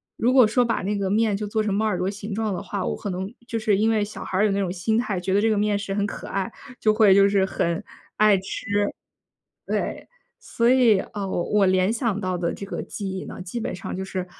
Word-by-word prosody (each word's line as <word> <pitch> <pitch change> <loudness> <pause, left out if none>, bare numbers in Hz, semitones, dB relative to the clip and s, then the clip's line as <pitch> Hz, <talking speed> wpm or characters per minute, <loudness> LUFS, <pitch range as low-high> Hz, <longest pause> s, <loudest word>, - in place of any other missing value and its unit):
如 240 - +2
果 255 -3 +6
说 245 +3 +3
把 230 -1 0
那 205 +2 -1
个 195 -1 -1
面 215 +1 +2
就 210 +1 -3
做 215 +1 -1
成 210 -2 -1
猫 215 +2 +1
耳 210 -4 0
朵 185 - -1
形 205 +1 -6
状 215 0 -1
的 - - -4
话， 200 -2 -3
我 - - -1
可 205 - -5
能 190 +2 -4 0.2
就 230 -2 -2
是 215 -2 +2
因 220 +2 +2
为 220 -2 +2
小 210 - -8
孩 185 - -3
儿 205 - +4
有 210 - +2
那 200 - 0
种 185 -3 -1
心 195 +5 0
态， 210 -6 -1
觉 190 +1 -2
得 200 - +4
这 225 - +3
个 215 - +2
面 205 0 +1
食 200 -1 -4
很 205 0 0
可 - - -7
爱， 195 +3 -2 0.3
就 215 - +3
会 215 -3 +6
就 200 +1 +6
是 195 -1 +3
很 170 0 -1 0.3
爱 215 -1 +6
吃。 190 +1 -6 1.0
对。 - - -3 0.3
所 235 +1 +1
以， 245 -6 +5
呃， 200 0 -5
我 175 - -1
我 210 -1 +4
联 185 +1 +3
想 230 -3 -1
到 185 -2 -1
的 170 -1 -1
这 200 - -7
个 195 - -4
记 200 -2 -5
忆 190 0 -5
呢， - - -8
基 185 +6 -5
本 220 - -3
上 - - -6
就 190 - -3
是 185 -1 -4
205 Hz, 285 characters per minute, -24 LUFS, 190-220 Hz, 1.0 s, 果